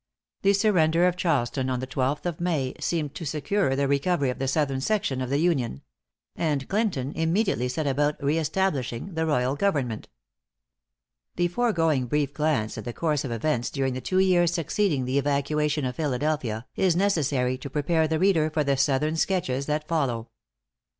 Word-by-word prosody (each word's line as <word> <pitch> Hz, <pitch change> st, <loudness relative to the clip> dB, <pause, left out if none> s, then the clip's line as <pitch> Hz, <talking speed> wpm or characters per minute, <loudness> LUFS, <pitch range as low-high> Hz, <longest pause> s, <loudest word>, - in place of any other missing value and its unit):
The 200 Hz, 0 st, +4 dB
surrender 180 Hz, -5 st, +3 dB
of 180 Hz, -1 st, +2 dB
Charleston 135 Hz, -7 st, 0 dB
on 125 Hz, -1 st, -1 dB
the 130 Hz, -, -3 dB
twelfth 135 Hz, +3 st, -2 dB
of 170 Hz, -2 st, -3 dB
May, 155 Hz, -7 st, 0 dB
seemed 155 Hz, -4 st, -2 dB
to 165 Hz, -, -7 dB
secure 155 Hz, 0 st, 0 dB
the 140 Hz, 0 st, +1 dB
recovery 140 Hz, 0 st, +1 dB
of -, -, -8 dB
the 135 Hz, -, -1 dB
southern 135 Hz, -2 st, 0 dB
section 140 Hz, -6 st, 0 dB
of 130 Hz, -, -3 dB
the 140 Hz, -, +1 dB
Union; 140 Hz, -, 0 dB, 0.5 s
and 145 Hz, -4 st, -1 dB
Clinton 190 Hz, -, -1 dB
immediately 165 Hz, -, +1 dB
set 150 Hz, +5 st, -2 dB
about 145 Hz, +2 st, +1 dB
re 145 Hz, +3 st, +1 dB
establishing 155 Hz, -3 st, -1 dB
the 160 Hz, 0 st, -1 dB
royal 130 Hz, -2 st, +1 dB
government. 140 Hz, -, -1 dB, 1.3 s
The 175 Hz, 0 st, +1 dB
foregoing 165 Hz, -, +1 dB
brief 145 Hz, +1 st, 0 dB
glance 145 Hz, -7 st, 0 dB
at -, -, -7 dB
the 120 Hz, -, -4 dB
course 150 Hz, -2 st, 0 dB
of 135 Hz, -, -4 dB
events 120 Hz, +1 st, -1 dB
during 135 Hz, -2 st, -1 dB
the 130 Hz, -, -4 dB
two 185 Hz, -, -1 dB
years 180 Hz, -3 st, +4 dB
succeeding 170 Hz, -4 st, 0 dB
the 130 Hz, +2 st, +1 dB
evacuation 145 Hz, +1 st, 0 dB
of 125 Hz, -1 st, -4 dB
Philadelphia, 140 Hz, -5 st, -1 dB
is 185 Hz, -3 st, +2 dB
necessary 145 Hz, -10 st, +1 dB
to 140 Hz, -, -7 dB
prepare 160 Hz, +3 st, +1 dB
the 160 Hz, 0 st, 0 dB
reader 165 Hz, -4 st, +3 dB
for 155 Hz, -1 st, 0 dB
the 140 Hz, -1 st, +1 dB
southern 140 Hz, +3 st, +1 dB
sketches 140 Hz, -8 st, 0 dB
that 150 Hz, 0 st, -1 dB
follow. 125 Hz, -8 st, -1 dB
150 Hz, 175 wpm, -26 LUFS, 130-170 Hz, 1.3 s, The